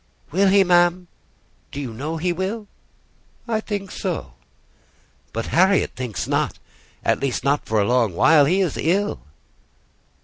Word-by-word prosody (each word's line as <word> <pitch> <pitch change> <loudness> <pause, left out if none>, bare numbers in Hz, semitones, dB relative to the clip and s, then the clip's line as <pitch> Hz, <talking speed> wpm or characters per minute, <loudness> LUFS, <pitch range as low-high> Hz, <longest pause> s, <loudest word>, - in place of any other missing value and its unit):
"Will 195 +5 +3
he, 195 +1 +5
ma'am? 175 0 +3 0.6
Do 140 - -6
you 130 -5 -5
know 150 +8 -4
he 175 +2 0
will?" 195 +5 -3 0.8
"I 225 -2 0
think 200 -3 -5
so." - - -4 1.0
"But 115 +1 -3
Harriet 190 +3 +3
thinks 125 -5 -4
not: - - -1 0.5
at - - +2
least 135 -3 -2
not 140 +1 0
for 110 -1 +1
a 100 - +2
long 115 -5 +1
while. 155 - +5
He 185 +7 +2
is 180 -6 -1
ill." 195 +6 0
175 Hz, 145 wpm, -22 LUFS, 135-190 Hz, 1.0 s, he